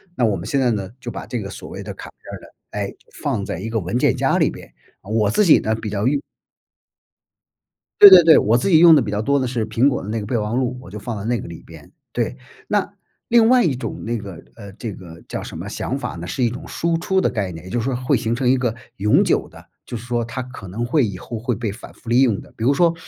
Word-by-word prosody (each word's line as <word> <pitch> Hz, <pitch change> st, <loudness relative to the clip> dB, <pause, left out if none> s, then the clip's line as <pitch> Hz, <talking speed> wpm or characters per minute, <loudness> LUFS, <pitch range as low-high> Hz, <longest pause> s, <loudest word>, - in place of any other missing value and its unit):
那 125 Hz, -, +2 dB
我 105 Hz, -3 st, +1 dB
们 85 Hz, -, -6 dB
现 140 Hz, +4 st, 0 dB
在 125 Hz, -2 st, +2 dB
呢， 100 Hz, -4 st, -3 dB
就 125 Hz, -, -6 dB
把 -, -, -7 dB
这 120 Hz, -3 st, -4 dB
个 100 Hz, -, -6 dB
所 -, -, -9 dB
谓 -, -, -7 dB
的 -, -, -6 dB
卡 -, -, -9 dB
片 -, -, -14 dB
儿 -, -, -5 dB
呢， -, -, -14 dB, 0.2 s
哎， -, -, -4 dB, 0.3 s
放 -, -, -1 dB
在 -, -, -4 dB
一 110 Hz, +5 st, -5 dB
个 115 Hz, 0 st, -1 dB
文 95 Hz, +5 st, -2 dB
件 -, -, +2 dB
夹 -, -, +1 dB
里 -, -, +3 dB
边， -, -, -12 dB, 0.3 s
呃 -, -, -14 dB
我 110 Hz, -2 st, +2 dB
自 210 Hz, -, +3 dB
己 165 Hz, -, +7 dB
呢 110 Hz, -, -1 dB
比 110 Hz, -1 st, -5 dB
较 100 Hz, +1 st, -2 dB
用 140 Hz, +1 st, +1 dB, 1.8 s
对 205 Hz, -, +12 dB
对 180 Hz, -2 st, +10 dB
对， 160 Hz, -1 st, +7 dB
我 110 Hz, +3 st, +3 dB
自 125 Hz, -, 0 dB
己 165 Hz, -, +6 dB
用 165 Hz, 0 st, +8 dB
得 145 Hz, -, +6 dB
比 115 Hz, -, -3 dB
较 105 Hz, +1 st, -2 dB
多 140 Hz, +3 st, +2 dB
的 130 Hz, -, -1 dB
是 120 Hz, -3 st, -2 dB
苹 115 Hz, +5 st, +2 dB
果 130 Hz, -, 0 dB
的 100 Hz, -, -7 dB
那 115 Hz, +1 st, -1 dB
个 105 Hz, -, -5 dB
备 120 Hz, +1 st, 0 dB
忘 105 Hz, +2 st, -2 dB
录， 125 Hz, 0 st, -1 dB
我 110 Hz, -, -13 dB
就 105 Hz, -, -7 dB
放 115 Hz, +1 st, -5 dB
在 100 Hz, -, -6 dB
那 120 Hz, -2 st, 0 dB
个 -, -, -8 dB
里 85 Hz, -1 st, -10 dB
边， 80 Hz, -3 st, -14 dB, 0.2 s
对。 -, -, -2 dB, 0.3 s
那 -, -, 0 dB, 0.3 s
另 230 Hz, -1 st, +5 dB
外 250 Hz, -1 st, +5 dB
一 145 Hz, -6 st, +1 dB
种 125 Hz, -, -6 dB
那 115 Hz, 0 st, -2 dB
个， 100 Hz, -5 st, -9 dB, 0.2 s
呃， 100 Hz, -3 st, -10 dB
这 110 Hz, 0 st, -6 dB
个 85 Hz, -3 st, -12 dB
叫 -, -, -4 dB
什 -, -, -8 dB
么 -, -, -6 dB
想 -, -, -3 dB
法 -, -, -5 dB
呢， 85 Hz, +1 st, -7 dB
是 125 Hz, -, -2 dB
一 120 Hz, -, +3 dB
种 120 Hz, -, -8 dB
输 170 Hz, 0 st, -1 dB
出 190 Hz, +2 st, +1 dB
的 -, -, +2 dB
概 100 Hz, -5 st, -2 dB
念， 80 Hz, -1 st, -10 dB
也 95 Hz, -, -9 dB
就 120 Hz, -, 0 dB
是 115 Hz, -, -3 dB
说 135 Hz, -1 st, -1 dB
会 130 Hz, +3 st, +1 dB
形 115 Hz, -1 st, -1 dB
成 125 Hz, +1 st, -1 dB
一 130 Hz, -, +5 dB
个 125 Hz, -3 st, -1 dB, 0.2 s
永 105 Hz, +2 st, +3 dB
久 -, -, 0 dB
的， -, -, -15 dB, 0.2 s
就 120 Hz, -, -6 dB
是 115 Hz, -, -10 dB
说 120 Hz, -1 st, -1 dB
它 125 Hz, +2 st, -5 dB
可 125 Hz, -6 st, -10 dB
能 110 Hz, +7 st, -3 dB
会 140 Hz, +4 st, +2 dB
以 95 Hz, -3 st, -6 dB
后 115 Hz, +4 st, -7 dB
会 120 Hz, +2 st, -1 dB
被 110 Hz, -1 st, -3 dB
反 110 Hz, +6 st, -11 dB
复 -, -, -22 dB
利 120 Hz, +3 st, +4 dB
用 115 Hz, -7 st, +2 dB
的。 -, -, -15 dB
比 110 Hz, -, -6 dB
如 130 Hz, -, +4 dB
说， 170 Hz, +3 st, +3 dB
115 Hz, 310 characters per minute, -21 LUFS, 105-130 Hz, 1.8 s, 对